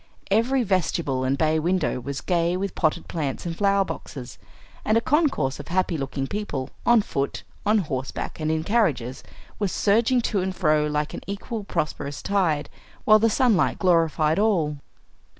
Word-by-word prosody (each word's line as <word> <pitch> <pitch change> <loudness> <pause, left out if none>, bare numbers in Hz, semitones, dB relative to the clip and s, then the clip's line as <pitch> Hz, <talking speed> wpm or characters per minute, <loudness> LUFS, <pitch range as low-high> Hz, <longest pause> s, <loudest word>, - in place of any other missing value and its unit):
Every 245 +5 +3
vestibule 170 - 0
and 130 +1 +1
bay 155 +1 +2
window 180 -3 0
was 140 +3 -5
gay 175 0 +1
with 195 0 -3
potted 165 +1 0
plants 145 -4 -3
and 170 -1 -3
flower 200 0 +2
boxes; 130 -8 -8 0.4
and 215 - +3
a - - +5
concourse 245 - +1
of 145 - -8
happy 180 -1 0
looking 135 -2 -3
people, 145 -8 -4 0.2
on 240 -3 +6
foot, 140 -6 -3 0.2
on 215 +1 +4
horseback, 140 -8 -3
and 155 0 -1
in 160 0 0
carriages, 155 - 0 0.4
was 200 -3 0
surging 230 +5 +3
to 210 -4 0
and 185 0 -2
fro 155 -4 +2
like 150 0 -2
an - - -6
equal, 205 +2 -5
prosperous 145 -5 -3
tide, 175 -7 +1 0.4
while 215 -1 +7
the 225 +1 +3
sunlight 225 -4 +2
glorified 165 -2 +2
all. 170 -9 +1
175 Hz, 165 wpm, -24 LUFS, 150-205 Hz, 0.4 s, while